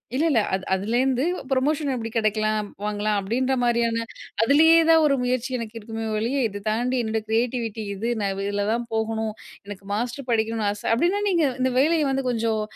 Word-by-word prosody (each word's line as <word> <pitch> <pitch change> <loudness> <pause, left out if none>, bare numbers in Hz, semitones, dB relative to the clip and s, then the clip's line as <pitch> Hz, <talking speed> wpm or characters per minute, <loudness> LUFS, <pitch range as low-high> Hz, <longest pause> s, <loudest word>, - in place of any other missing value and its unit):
இல்லல்ல. 295 -5 +3
அது 190 0 -1
அதுலேருந்து 245 +7 +1 0.3
ப்ரமோஷன் 285 +2 +1
எப்டி 225 -1 -4
கெடைக்கலாம்? 215 -1 0 0.2
வாங்கலாம். 210 0 0
அப்டீன்ற 250 +7 0
மாரியான 235 -1 +1 0.5
அதுலயே 320 +6 +6
தான் 325 -1 +6
ஒரு 280 -2 +3
முயற்சி 250 0 -1
எனக்கு 230 -1 -6
இருக்குமே 225 +1 -6
ஒழிய, 240 +6 -1
இத 205 -1 -8
தாண்டி 245 +4 0
என்னோட 220 0 -1
கிரியேட்டிவிட்டி 230 -1 -1
இது, 230 +5 -3
நான் 195 -1 0
இதில 205 0 -1
தான் 235 0 -2
போகணும். 220 0 -1 0.3
எனக்கு 200 -1 -9
மாஸ்டர் 245 +4 -3
படிக்கணும்னு 220 -1 0
ஆச 205 - -8
அப்டின்னா, 355 - +1
நீங்க 340 -4 +2 0.2
இந்த 260 0 +2
வேலைய 305 -1 +3
வந்து 270 0 -1
கொஞ்சம் 225 -2 0
230 Hz, 165 wpm, -24 LUFS, 215-260 Hz, 0.5 s, அதுலயே